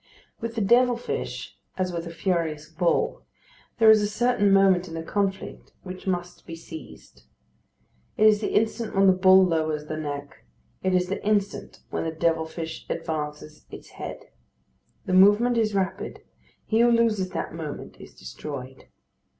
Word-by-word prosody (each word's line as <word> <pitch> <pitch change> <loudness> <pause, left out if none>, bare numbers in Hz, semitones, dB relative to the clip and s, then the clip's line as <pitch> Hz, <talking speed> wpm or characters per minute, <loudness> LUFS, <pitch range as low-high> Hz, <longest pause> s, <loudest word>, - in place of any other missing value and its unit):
With 230 0 -5
the 225 - -1
devil 240 +4 +4
fish, 240 - -5 0.2
as 185 -1 -1
with 170 0 -4
a - - -7
furious 165 -4 -2
bull, 170 +2 0 0.6
there 225 -1 +7
is 215 -1 +5
a 205 - +1
certain 210 -1 +2
moment 190 -2 +4
in 165 - -8
the 165 - -4
conflict 195 +2 -3
which 185 0 -9
must 175 -1 -3
be 165 - -6
seized. 160 - -12 0.9
It 215 - +4
is 215 -1 +5
the - - -2
instant 220 0 0
when 195 0 +4
the 190 - +7
bull 185 0 +6
lowers 155 -3 -1
the 155 0 -5
neck; 145 -2 -6 0.4
it 185 0 +1
is 180 0 +1
the 195 - -4
instant 205 -1 -1
when - - -2
the 165 - -2
devil 160 0 0
fish 160 0 -6
advances 150 -1 -5
its - - -11
head. - - -8 0.8
The 185 - -2
movement 205 +6 +5
is 215 -3 +1
rapid. 190 -1 -2 0.4
He 220 - +1
who 240 +1 +5
loses 225 -5 +2
that 170 -3 -4
moment 160 -3 -7
is - - -13
destroyed. 130 - -8
185 Hz, 165 wpm, -25 LUFS, 160-210 Hz, 0.9 s, there